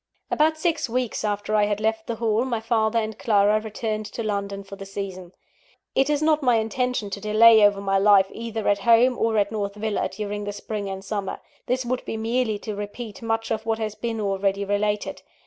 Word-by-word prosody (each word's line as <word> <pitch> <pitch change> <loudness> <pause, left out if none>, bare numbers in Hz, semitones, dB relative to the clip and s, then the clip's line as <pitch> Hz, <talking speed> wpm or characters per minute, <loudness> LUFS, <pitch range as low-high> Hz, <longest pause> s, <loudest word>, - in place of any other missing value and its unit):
About 315 +1 +3
six 325 -5 0
weeks 245 -2 -2
after 205 0 -2
I 210 -1 +4
had 205 0 -1
left 220 0 -1
the 235 - -2
Hall, 225 0 +1
my 245 -3 -1
father 225 0 +1
and 220 -1 -2
Clara 210 -1 +3
returned 215 -1 -3
to 230 - -5
London 200 -2 -3
for 195 0 -10
the 195 - -9
season. 190 -3 -6 0.6
It 270 +2 +2
is 295 0 +1
not 310 -1 +3
my 250 -3 +3
intention 225 0 -1
to 200 - -5
delay 220 +1 +6
over 205 -1 +4
my 195 -1 +1
life 200 -1 +6
either 225 -1 -4
at 200 0 +3
home 235 +4 +5
or 225 -1 +1
at 205 0 +2
North 200 -2 -3
Villa, 210 0 -1
during 205 0 -4
the 205 - -4
spring 205 0 -5
and 190 0 -6
summer. 200 -1 -3 0.3
This 255 0 0
would 250 +1 -2
be 225 - -4
merely 225 0 0
to 215 - -3
repeat 205 +1 -7
much 225 0 -2
of 220 -1 -1
what 225 -1 +1
has 215 -2 -3
been 230 0 -4
already 200 -1 0
related. 205 +1 -1
215 Hz, 210 wpm, -24 LUFS, 205-230 Hz, 0.6 s, delay